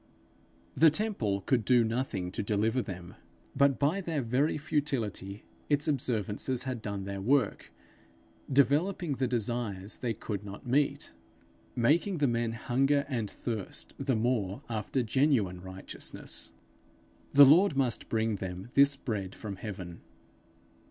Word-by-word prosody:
The 160 - +7
temple 150 - -1
could 120 +3 +1
do 125 +1 +4
nothing 110 -6 -2
to - - -3
deliver 110 +4 +1
them; 90 -4 -8 0.4
but, 140 -1 +4
by 155 +8 +1
their 160 -6 -2
very 130 +8 +1
futility, 130 -10 -2 0.3
its 145 0 +2
observances 120 -3 0
had 130 -4 -4
done 100 -2 -4
their 100 0 -5
work, 125 +1 +1 0.8
developing 150 +6 +2
the 130 -1 0
desires 115 -4 -1
they 115 -3 -2
could 105 -2 -5
not 100 +3 -9
meet, 135 +3 0 0.6
making 165 - +2
the 145 -2 +2
men 120 -1 0
hunger 135 +5 +1
and 115 -6 -2
thirst 110 -4 -6
the 135 -2 0
more 110 -4 -1
after 115 +3 -1
genuine 115 -8 +1
righteousness: 95 0 -7 0.8
the 140 0 +10
Lord 160 +2 +5
must 130 -4 0
bring 110 -2 0
them 95 +4 -6
this 140 0 +5
bread 105 -8 -4
from 100 -3 -6
heaven. 90 -5 -7
120 Hz, 130 wpm, -30 LUFS, 100-140 Hz, 0.8 s, the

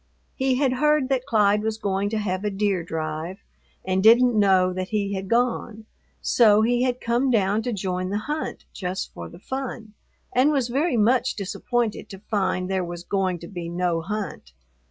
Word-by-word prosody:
He 265 -1 +1
had 265 -1 +2
heard 300 0 +2
that 265 -1 0
Clyde 210 -4 +3
was 220 0 -2
going 200 -1 -1
to 220 - -2
have 190 -2 -2
a 210 - 0
deer 200 -2 0
drive, 160 +2 -4 0.5
and 190 0 +1
didn't 240 +4 +6
know 190 -3 +4
that 185 0 -3
he 200 -2 -1
had 190 0 -4
gone, 230 -1 0 0.4
so 215 -3 +5
he 240 +2 +2
had 250 -1 0
come 240 +3 +1
down 210 -2 +2
to 245 - -3
join 185 -3 -2
the 200 - -1
hunt 295 +8 -4
just 185 0 -4
for 85 -1 -8
the - - -13
fun, 240 -1 -6 0.4
and 255 +4 +4
was 265 -5 0
very 280 +2 +1
much 245 +4 +2
disappointed 225 +3 -2
to 195 - -8
find 190 -3 -1
there 190 -1 -1
was 175 0 -6
going 190 -2 -1
to - - -9
be 175 -3 -6
no 175 -1 0
hunt. 195 - -5
210 Hz, 185 wpm, -24 LUFS, 185-245 Hz, 0.5 s, didn't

